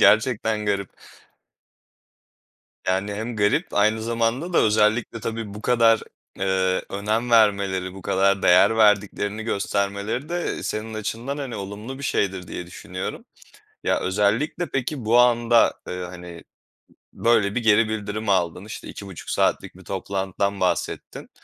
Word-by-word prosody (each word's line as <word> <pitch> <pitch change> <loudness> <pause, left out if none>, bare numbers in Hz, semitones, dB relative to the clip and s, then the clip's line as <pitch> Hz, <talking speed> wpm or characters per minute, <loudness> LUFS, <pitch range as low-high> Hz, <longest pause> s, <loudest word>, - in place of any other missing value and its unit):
Gerçekten 110 -1 +3
garip. 100 -2 -1 2.0
Yani, 95 +2 0
hem 110 +2 -4
garip 105 -1 +1
aynı 110 +2 +2
zamanda 115 +9 -1
da - - +4
özellikle 110 +2 +2
tabii 110 -2 -4
bu 105 - -9
kadar, 115 -2 +4 0.4
eee, 95 -1 +1
önem 110 +4 -1
vermeleri, 100 -4 +3
bu 95 - -10
kadar 100 +1 +2
değer 95 +5 +5
verdiklerini 105 0 +2
göstermeleri 100 +5 -2
de 175 0 -2
senin 110 +1 -4
açından, 115 +6 -4
hani, 130 -5 -5
olumlu 105 +7 -7
bir - - -9
şeydir, 95 -7 -1
diye 90 - -6
düşünüyorum. 95 +1 -6 0.6
Ya, - - +1
özellikle 105 - 0
peki, 135 -1 -2
bu 115 +3 +4
anda, 120 -1 +4
ııı, 90 0 -4
hani, 90 -1 -10 0.7
böyle 110 -3 +2
bir 120 - -1
geri 110 0 +4
bildirimi 110 0 -2
aldın. 90 0 0
İşte, 105 - -8
2,5 95 -4 -9
saatlik - - 0
bir 95 - -14
toplantıdan 95 +1 -2
bahsettin. 90 - -2
105 Hz, 130 wpm, -23 LUFS, 100-115 Hz, 2.0 s, değer